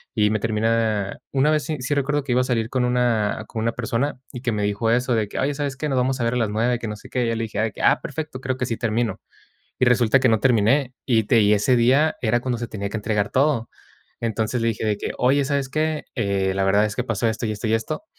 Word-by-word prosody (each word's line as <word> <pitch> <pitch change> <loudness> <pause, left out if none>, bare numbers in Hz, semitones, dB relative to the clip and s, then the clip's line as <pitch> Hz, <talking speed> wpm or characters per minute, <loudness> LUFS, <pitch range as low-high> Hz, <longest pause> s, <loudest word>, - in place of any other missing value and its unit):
Y 105 -1 +3
me 110 - 0
termina 110 -2 0
una 140 +3 +3
vez 155 -1 +1
sí 155 +2 -3
sí 130 +4 -1
recuerdo 145 +1 0
que 135 - -4
iba 125 - +3
a - - -1
salir 115 -3 -1
con 125 -1 0
una 120 -4 +1
con 110 - -5
una 115 0 0
persona 125 +3 -2
y 125 - -6
que 125 - -1
me 105 -1 -1
dijo 105 +3 0
eso 125 +1 +1
de 110 -2 0
que: - - -5
"Oye, 145 +2 0
¿sabes 140 -2 -3
qué? 150 +3 -2
Nos 135 - 0
vamos 130 +1 0
a - - +1
ver 115 - 0
a - - +1
las 115 -3 0
9, 115 +3 0
que 115 - -5
no 105 - -4
sé - - -14
qué". 125 -1 0
Y - - 0
yo 115 - 0
le 115 - -2
dije: 110 -1 -2
"Ah, - - +4
perfecto, 155 -3 -5
creo 130 -1 -2
que 130 - -1
sí 115 - -2
termino". 115 0 -1 0.6
Y 125 - +4
resulta 125 +1 +4
que 125 - +3
no 110 - +3
terminé 125 +3 +2
y 115 -4 +3
te 115 +1 +4
y 105 0 +4
ese 105 +5 +2
día 130 +7 +3
era 120 +1 +2
cuando 125 -1 -2
se 120 0 -5
tenía 100 -2 -4
que 110 - -3
entregar 105 0 -1
todo. 135 -4 +1 0.5
Entonces 115 +1 -1
le 115 - +2
dije 110 -1 -2
de 105 - +1
que: - - -4
"Oye, 135 +3 +3
¿sabes 140 -1 -1
qué? 155 +2 -1
Eh, 100 -5 0
la 95 - 0
verdad 100 +2 +3
es 105 - -5
que - - 0
pasó 110 0 -1
esto, 110 +2 -3
y - - -2
esto, 105 +1 -5
y 110 - +2
esto". 115 - -3
115 Hz, 275 wpm, -22 LUFS, 110-130 Hz, 0.6 s, Ah